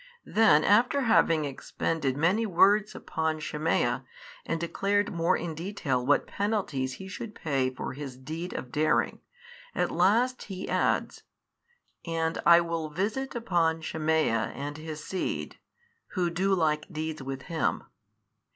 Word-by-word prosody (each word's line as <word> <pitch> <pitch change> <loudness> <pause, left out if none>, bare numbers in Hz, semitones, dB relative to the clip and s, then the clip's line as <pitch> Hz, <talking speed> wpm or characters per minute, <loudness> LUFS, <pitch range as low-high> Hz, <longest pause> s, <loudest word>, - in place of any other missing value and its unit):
Then 155 -9 +5
after 240 +7 +4
having 165 - +3
expended 140 0 -2
many 180 +9 +2
words 205 +1 +3
upon 160 -1 -2
Shemaiah, 155 +1 0 0.4
and 165 - -1
declared 200 +4 0
more 170 +2 +2
in 170 -2 -4
detail 160 -7 -2
what 145 +3 +3
penalties 195 -11 -1
he 190 +9 -9
should 210 +3 -7
pay 135 -4 0
for 130 - -6
his 135 -2 -7
deed 160 +7 -6
of 125 - -6
daring, 155 +1 +1 0.5
at - - 0
last 245 +5 +2
He 190 -2 -6
adds, - - 0 0.8
and 165 -1 -1
I 170 0 +8
will 165 -2 -3
visit 215 - -2
upon 170 -8 +1
Shemaiah 155 -8 +1
and 145 +1 -5
his 155 0 -7
seed, 190 - -3 0.5
who 180 -3 0
do 190 +3 +2
like 155 -1 0
deeds 155 -1 -4
with 135 0 -5
him 165 -2 -1
26. - - -24
165 Hz, 140 wpm, -28 LUFS, 150-195 Hz, 0.8 s, I